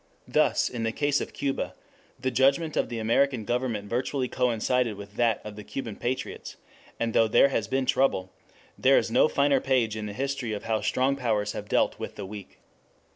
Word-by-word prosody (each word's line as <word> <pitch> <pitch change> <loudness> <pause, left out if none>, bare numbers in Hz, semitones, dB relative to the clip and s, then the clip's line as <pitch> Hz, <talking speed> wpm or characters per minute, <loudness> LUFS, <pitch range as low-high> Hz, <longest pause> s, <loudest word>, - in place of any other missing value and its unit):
Thus - - +2
in 120 - -5
the 115 0 0
case 145 +3 +1
of - - -5
Cuba 140 -1 -3 0.4
the 130 - -1
judgment 140 +5 +2
of - - 0
the 120 - -4
American 115 +1 +1
government 120 -4 -2
virtually 130 +3 -1
coincided 125 -1 0
with 100 0 -10
that 115 -3 +2
of 105 -1 -7
the 105 - -8
Cuban 115 -2 -5
patriots, 125 +5 -4 0.4
and 115 -1 -1
though 115 - +4
there 140 - +5
has 115 -6 -1
been 130 +3 0
trouble, 125 -8 +1 0.5
there - - +5
is - - +1
no - - +5
finer 140 -1 +2
page 125 -5 +1
in 110 -1 -4
the 105 - -6
history 135 -2 -2
of 105 - -5
how 110 -1 0
strong 135 +2 +1
powers 110 -6 0
have 105 - -7
dealt - - +1
with - - -6
the - - -6
weak. 100 0 -10
120 Hz, 195 wpm, -27 LUFS, 110-135 Hz, 0.5 s, there